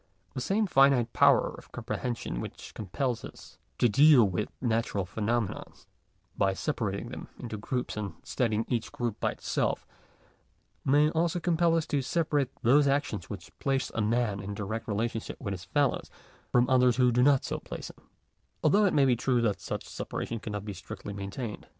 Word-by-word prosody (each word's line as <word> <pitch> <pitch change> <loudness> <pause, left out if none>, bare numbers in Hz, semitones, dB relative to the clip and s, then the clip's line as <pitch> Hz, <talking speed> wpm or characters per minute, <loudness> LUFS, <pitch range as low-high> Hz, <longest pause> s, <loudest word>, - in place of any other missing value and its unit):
The 130 - -4
same 205 - +1
finite 135 - +4
power - - +5
of - - -13
comprehension 115 - -4
which - - -8
compels 120 +4 -2
us - - -12 0.2
to 120 - +4
deal 140 +3 +7
with 95 +3 -2
natural 115 -5 0
phenomena 110 +3 -1 0.7
by 95 -1 +2
separating 110 -4 -2
them - - -7
into 115 -3 -6
groups 125 +4 -3
and 105 -2 -4
studying 115 -3 0
each 115 -3 -2
group 120 -3 -3
by - - 0
itself, - - -1 1.0
may 145 +3 +4
also 170 +1 +1
compel 170 0 +2
us 160 - 0
to 145 -2 0
separate 145 -1 0
those 140 +5 +5
actions 135 -9 -1
which - - -8
place 135 -1 0
a 110 - -1
man 110 -2 +1
in 100 0 -5
direct 110 +2 -4
relationship 115 +1 -2
with 100 -6 -4
his 95 -1 -5
fellows, 140 +9 0 0.4
from 125 0 +4
others 125 -2 +4
which 125 -2 +4
do 125 - +3
not 140 0 +4
so - - -3
place - - -7
him; - - -26 0.5
although 210 +1 +5
it 190 - +2
may 140 -2 +5
be 125 -2 +4
true 125 +1 +1
that 105 -4 0
such - - -4
a - - -12
separation 115 - -4
cannot 105 -2 -5
be 105 - -4
strictly 95 +2 -8
main 100 0 -5
tained. 110 +1 -6
120 Hz, 180 wpm, -29 LUFS, 105-140 Hz, 1.0 s, deal